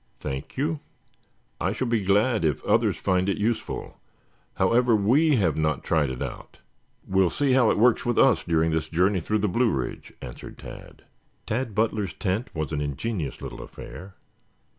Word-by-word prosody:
"Thank 65 - -6
you. 150 +3 0 0.8
I 95 +3 0
shall 130 - -2
be 115 -4 0
glad 105 +3 +2
if 75 -4 0
others - - +2
find 95 +1 +1
it 100 - 0
useful. 110 +2 -3 0.6
However, 120 -1 +3
we 135 +10 +4
have 90 -9 +2
not 75 -3 0
tried 80 -4 +1
it 65 -1 -4
out. - - -8 0.5
We'll 95 -1 +3
see 140 - 0
how 125 -3 +5
it - - +2
works 120 +3 +4
with 120 -2 -1
us 135 -5 +5
during 80 -1 +1
this 80 -1 -1
journey 90 +4 +2
through 105 +6 0
the - - +3
Blue 115 +6 +2
Ridge," 65 - -4
answered - - -9
Tad. - - -11 0.4
Tad 115 -1 -2
Butler's 105 -3 0
tent 100 +5 -2
was 75 -2 -3
an 75 -2 -1
ingenious 75 - -3
little - - -7
affair. 95 +2 -10
100 Hz, 170 wpm, -25 LUFS, 80-115 Hz, 0.8 s, how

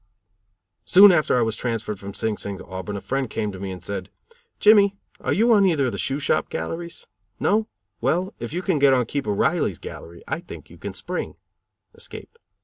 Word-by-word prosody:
Soon 195 +2 +8
after 155 -7 +3
I 120 - +3
was 115 -1 -1
transferred 115 -4 -3
from 100 0 -8
Sing 110 -1 -1
Sing 100 -1 -6
to - - -11
Auburn, 95 +2 -5
a - - -6
friend 135 -2 -2
came 105 -1 -2
to 95 - -9
me 95 0 -4
and 90 -2 -7
said: 95 0 -5 0.5
"Jimmy, 200 -2 +6 0.2
are - - -2
you 230 +4 +4
on 205 -2 +5
either 160 -8 +3
of 125 - 0
the - - -5
shoe 135 - 0
shop 145 - 0
galleries? 165 - -5 0.3
No? 215 +2 +2 0.3
Well, 175 +10 0
if 120 - -5
you 175 +4 -3
can 180 -6 +1
get 140 -1 +6
on 125 -2 +2
Keeper 115 -3 -2
Riley's 100 - +1
gallery 85 +1 -10
I 160 - -2
think 175 - -11
you - - -14
can - - -6
spring - - -4 0.6
(escape)." 465 - -10
130 Hz, 205 wpm, -23 LUFS, -, 0.6 s, Soon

